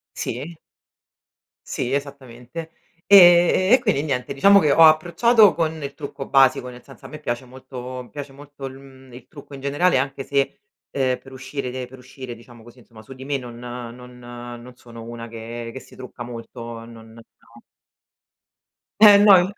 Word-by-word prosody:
Sì. 150 +8 -5 1.1
Sì, 125 - -3
esattamente. 140 +2 -6 0.3
E 180 0 +6
e 255 - +8
quindi 210 - 0
niente, 135 -2 -3
diciamo 200 +8 +6
che 150 -6 +2
ho 165 - +5
approcciato 185 +8 +5
con 160 -1 -2
il 140 0 -6
trucco 140 -2 -8
basico, 130 -2 +3
nel 125 0 -12
senso 135 - -15
a - - -12
me 155 - -10
piace 120 +2 -4
molto 130 0 -9
mi 120 - -18
piace 145 -2 -8
molto 145 0 -13
il, 130 0 -9
mhmm, 130 -2 -17
il 125 0 -13
trucco 145 -1 -13
in 135 - -9
generale, 145 +5 +1
anche 135 +1 -2
se, 140 +6 -1 0.3
ehm, 130 -2 -1
per 135 - -16
uscire 135 0 -6
de 130 0 -6
per 130 +1 -14
uscire, 130 -1 -10
diciamo 120 0 -17
così, 120 +2 -16
insomma, 115 -2 -16
su 135 - -13
di 130 0 -11
me 140 -1 -2
non 120 -2 -10
non 125 0 -9
non 120 0 -10
sono 115 -2 -12
una 115 0 -8
che 115 +1 -8
che 130 - -7
si - - -17
trucca 125 -1 -9
molto, 115 -1 -9
non 115 -1 -14
no. 115 - -14 1.8
Eh 205 -2 +9
no 205 -1 +7
in 185 +3 0
130 Hz, 180 wpm, -22 LUFS, 120-145 Hz, 1.8 s, Eh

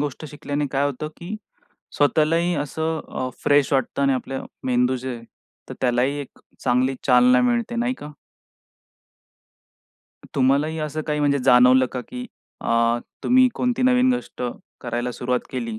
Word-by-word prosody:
गोष्ट 145 +1 -4
शिकल्याने 145 0 -3
काय 140 +1 +1
होतं, 145 +2 -4
की 185 +5 -6 0.6
स्वतःलाही 165 +4 +2
असं 160 +2 -2
अ, 130 - -3
फ्रेश 145 -1 +3
वाटतं 135 +1 0
आणि 140 - +3
आपलं 135 +1 -4 0.2
मेंदू 125 0 +2
जे 130 0 -5
आहे 115 - -12 0.4
तर - - -6
त्यालाही 125 +3 +1
एक 140 - -11 0.3
चांगली 130 +2 +2
चालना 125 -1 +5
मिळते. 240 -1 0
नाही 245 +2 0
का? 150 -11 -10 2.2
तुम्हालाही 140 +4 +2
असं 155 0 -3
काही 150 -1 -1
म्हणजे 140 -1 +2
जाणवलं 130 0 +6
का? 125 - -3
की 250 - -8 0.3
अ, 115 0 +2 0.3
तुम्ही 255 +1 +5
कोणती 250 0 0
नवीन 255 0 +4
गोष्ट 245 - -6 0.4
करायला 120 +1 -3
सुरुवात 125 +1 -1
केली 115 -4 -4
140 Hz, 145 wpm, -22 LUFS, 125-160 Hz, 2.2 s, जाणवलं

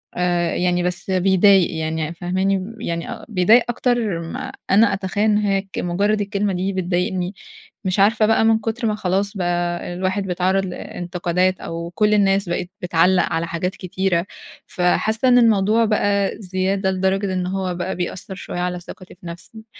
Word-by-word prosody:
آآ 175 -1 0
يعني 180 0 +1
بس 180 +1 -1
بيضايق 190 0 +4
يعني 160 0 -2
فاهماني؟ 190 +4 -1
يعني 170 0 -4
بيضايق 215 +4 +5
أكتر 240 -6 0
ما 165 - -6 0.2
أنا 210 +2 +5
أتخيّل 195 +1 -2
إن 210 -1 +3
هيّ 200 -2 +1
ك 195 0 -8
مجرّد 200 +4 0
الكلمة 200 0 -1
دي 185 +2 -2
بتضايقني، 180 +1 -1 0.5
مش 185 +1 0
عارفة 215 +2 +4
بقى 225 +1 +3
من 225 0 +4
كتر 225 +2 -2
ما 215 - 0
خلاص 200 +1 -1
بقى 175 -1 -2
الواحد 185 +2 -1
بيتعرّض 185 +2 +1
لإنتقادات، 180 0 -2
أو 170 +1 -5
كُل 210 +4 +3
الناس 195 -2 +2
بقِت 175 0 -2
بتعلّق 180 +1 +3
على 165 +1 -1
حاجات 180 +3 -3
كتيرة، 185 -1 -1 0.4
فحاسة 220 +7 +1
إن 250 -1 +6
الموضوع 225 -1 +4
بقى 205 -2 +1
زيادة 190 +1 -1
لدرجة 190 +1 0
إن 185 -1 -1
هو 185 -1 -2
بقى 180 +2 -3
بيأثّر 180 +2 -5
شوية 180 -1 -6
على 180 0 -2
ثقتي 180 +1 -12
في 175 - -18
نفسي. 195 +6 -9
190 Hz, 160 wpm, -21 LUFS, 180-205 Hz, 0.5 s, إن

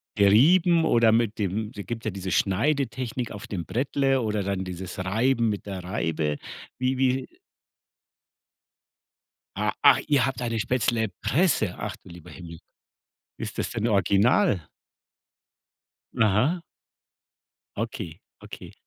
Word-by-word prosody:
gerieben 160 - +5
oder 115 -1 +4
mit 115 -1 +1
dem 105 +3 -2
es 100 - -7
gibt 115 -1 -5
ja 110 - -1
diese 95 0 -5
Schneidetechnik 125 +2 0
auf 105 -1 -8
dem 90 -5 -4
Brettle 135 - 0
oder 105 -2 -1
dann 95 -1 -2
dieses 90 +1 -7
Reiben 115 +4 +1
mit 105 - -4
der 95 -3 -6
Reibe. 80 -5 -2 0.4
Wie 130 +1 0
wie 130 0 +1 2.3
A - - 0
ach, - - +7
ihr 140 -4 +3
habt 125 -2 -3
eine 115 -1 -1
Spätzlepresse. 115 - 0
Ach, - - -5
du - - -16
lieber 85 -2 -12
Himmel. 85 -3 -10 0.8
Ist - - -6
das - - -2
denn 115 +1 -1
original? 100 - +2 1.5
Aha. 115 - +2 1.2
Okay, 80 -1 -5 0.2
okay. - - -10
110 Hz, 120 wpm, -25 LUFS, 95-130 Hz, 2.3 s, ach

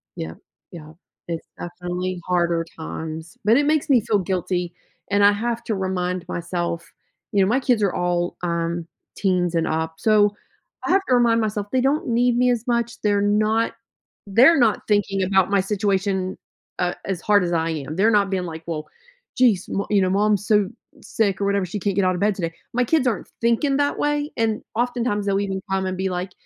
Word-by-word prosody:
Yep 80 0 -6 0.3
yep, 155 -2 -11 0.3
it's 165 -1 -4
definitely 180 +1 -4
harder 170 -2 +1
times, 160 +5 -7
but 225 +3 +5
it 285 +1 +3
makes 305 -1 +1
me 250 -5 +5
feel 205 -1 +1
guilty 180 -1 -2 0.4
and 200 0 +3
I 205 - +7
have 230 +3 -2
to 220 - -1
remind 185 -2 -2
myself 170 -1 -3 0.4
you 200 - +3
know, 190 - +3
my 250 +4 +3
kids 245 -5 +2
are 195 - +1
all, 175 -1 -1
um, 170 0 -2 0.3
teens 180 -3 +1
and 165 - +1
up, 160 0 -2
so, 210 -1 +3 0.5
I - - 0
have 390 +1 +4
to 250 - +5
remind 235 -1 +4
myself 210 -1 -2
they 260 -1 +2
don't 275 +3 +1
need 240 +1 +2
me 250 0 +3
as 235 -1 -1
much, 235 0 -1
they're 205 -1 +2
not 215 +2 +2 0.5
they're 255 +11 +6
not 225 -3 +3
thinking 200 -2 +1
about 190 0 +3
my 200 - +4
situation, 195 -1 -1 0.4
uh, 180 0 +1
as 190 -3 -3
hard 205 -2 +3
as 175 - -1
I 165 0 +1
am, 155 -1 -4
they're 210 +4 +3
not 205 -2 +3
being 185 -2 -1
like, 160 -1 -7
"Well, 155 -2 -4 0.5
geez, 225 -8 +3
mo 200 - -2
you 200 -2 +4
know, 185 - +2
mom's 205 +1 +1
so 210 -3 +3 0.3
sick 200 -4 0
or - - +1
whatever, 200 -1 +1
she 200 +4 -5
can't 200 0 -1
get 200 -2 +2
out 185 0 +2
of 180 - -5
bed 210 0 +3
today," 165 -3 -3 0.2
my 250 +1 +2
kids 300 0 +2
aren't 225 - -2
thinking 255 +4 +2
that 285 0 0
way, 295 0 0
and 225 -1 0
oftentimes, 240 -3 -1
they'll 195 0 +2
even 195 -1 -2
come 190 0 0
and 185 0 -2
be 190 0 -1
like, 180 +1 -3
200 Hz, 200 wpm, -22 LUFS, 180-225 Hz, 0.5 s, I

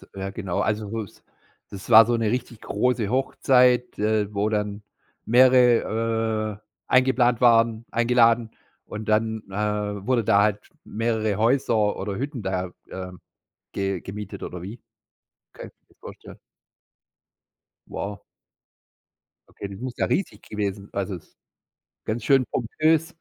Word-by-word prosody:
ja 95 0 -4
genau. 95 -4 -4
Also, 105 -1 -1 0.2
das - - -21 0.5
das 100 +4 -9
war 110 -1 +9
so 120 0 +1
'ne 115 -1 0
richtig 120 -2 -4
große 115 -1 0
Hochzeit, 125 -1 +2
äh, 105 -1 0
wo 105 +2 0
dann 105 -1 -2 0.4
mehrere, 115 -3 +3 0.3
äh, - - -6
eingeplant 130 -2 +3
waren 115 -1 +4
eingeladen 115 -1 +3 0.4
und 105 0 -7
dann, 110 0 0
äh, 105 0 -3
wurde 125 -3 +2
da 100 0 +4
halt 105 -1 +1 0.2
mehrere 110 -2 -1
Häuser 115 -3 +2
oder 100 0 -4
Hütten 135 -2 -4
da, 95 -2 -3 0.2
ähm, 90 -1 -8 0.5
ge 95 -2 -2
gemietet 100 0 -8
oder 90 - -6
wie 110 +5 -8 0.7
kann - - -9
ich - - -21
mir - - -49
das - - -30
vorstellen? - - -12 1.5
Wow. 100 0 -6 1.3
Okay, 100 - -8
das 100 0 -10
muss 125 -1 -5
ja - - +1
riesig 195 - -2
gewesen 100 -1 -4
also, 100 -1 -3
ist 85 - -15 0.7
ganz 110 +1 -3
schön 135 -2 +4
pompös. 160 +7 0
110 Hz, 135 wpm, -24 LUFS, 100-120 Hz, 1.5 s, war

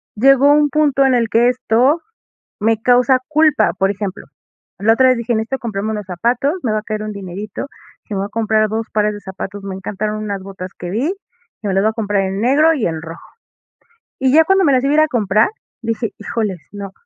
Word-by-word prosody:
llegó 275 +5 +5
un 295 0 +4
punto 285 -2 +2
en 260 - +3
el 230 -2 +1
que 230 +2 +3
esto 255 +5 +2 0.6
me 225 0 +1
causa 250 +1 +4
culpa, 310 -1 +3
por 195 +1 +2
ejemplo, 200 -1 -5 0.5
la 220 +3 +3
otra 260 +2 +4
vez 255 - +4
dije: 235 0 -1
"Necesito 220 +5 -2
comprarme 220 -2 -3
unos 210 -1 -4
zapatos, 240 - 0
me 230 - -1
va 215 - 0
a - - -18
caer 215 -1 -4
un 215 0 -5
dinerito", 200 +1 -7 0.4
dije: 210 - -6
"Me - - -2
voy 195 - -1
a - - -10
comprar 220 -1 +1
2 220 +1 -3
pares 210 0 +1
de 205 - -8
zapatos". 195 +1 -7
Me 195 -1 -5
encantaron 210 +3 -4
unas 200 -2 -4
botas 190 -1 -8
que 175 - -6
vi, 215 - -1
dije: 360 - 0 0.5
"Me 200 - -1
las 195 - +2
voy 220 - +3
a - - -7
comprar 205 -3 0
en 190 +1 -3
negro 305 +6 +4
y 265 -8 -1
en 160 -1 -2
rojo". 165 +1 -10 0.9
Y 260 0 +2
ya 320 +1 +6
cuando 385 +1 +3
me 285 - +4
las 255 - +2
iba 280 - +2
a - - +3
ir - - +5
a 310 - +4
comprar, 215 -5 +2 0.3
dije: 225 -1 -2
"Híjoles, 210 -4 -3
no" 200 -1 -7
220 Hz, 230 wpm, -18 LUFS, 200-255 Hz, 0.9 s, ya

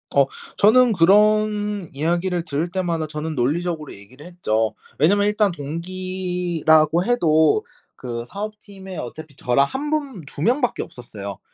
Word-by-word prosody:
어 140 -1 +6 0.3
저는 240 +3 +5
그런 210 +1 +3
이야기를 170 +4 0
들을 155 +1 -2
때마다 170 -3 -2
저는 155 +1 -4
논리적으로 155 +4 -1
얘기를 125 +9 -13
했죠. 115 -12 -1 0.2
왜냐하면 200 +7 +3
일단 210 -1 +2
동기라고 175 0 0
해도 180 - +3 0.3
그 120 -2 -5
사업팀에 200 - -8
어차피 150 +3 -8
저랑 130 +1 +2
1 280 - -4
분 285 - -2
2 140 - -9
명 245 - +2
밖에 245 - 0
없었어요. 100 -5 -8
175 Hz, 290 characters per minute, -22 LUFS, 150-205 Hz, 0.3 s, 어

